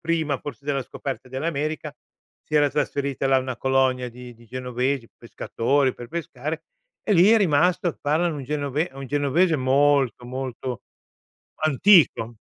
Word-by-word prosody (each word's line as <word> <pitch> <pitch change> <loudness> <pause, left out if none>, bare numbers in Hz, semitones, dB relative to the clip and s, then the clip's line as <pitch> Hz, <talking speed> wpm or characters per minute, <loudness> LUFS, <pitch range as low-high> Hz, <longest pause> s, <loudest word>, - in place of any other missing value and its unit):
prima 160 -4 -1
forse 140 -2 -9
della 140 -2 -1
scoperta 135 0 -6
dell'America, 150 +2 -3 0.5
si 155 - -7
era 145 -1 +4
trasferita 140 -1 -1
là 135 0 +4
una 130 -1 -4
colonia 130 -1 +1
di 125 +1 -11
di 115 0 -19
genovesi, 125 +1 -2
pescatori 130 +3 0
per 120 - -9
pescare 155 -1 -5 0.4
e 210 - 0
lì 185 +4 +6
è 225 - +7
rimasto 175 -1 +2
e 165 - -6
parlano 155 +2 0
un 135 - -6
genove 145 +3 -2
un 135 -1 -7
genovese 145 +4 +2
molto, 135 -1 +2
molto 130 -1 -5 0.8
antico. 145 - +4
140 Hz, 145 wpm, -24 LUFS, 130-155 Hz, 0.8 s, è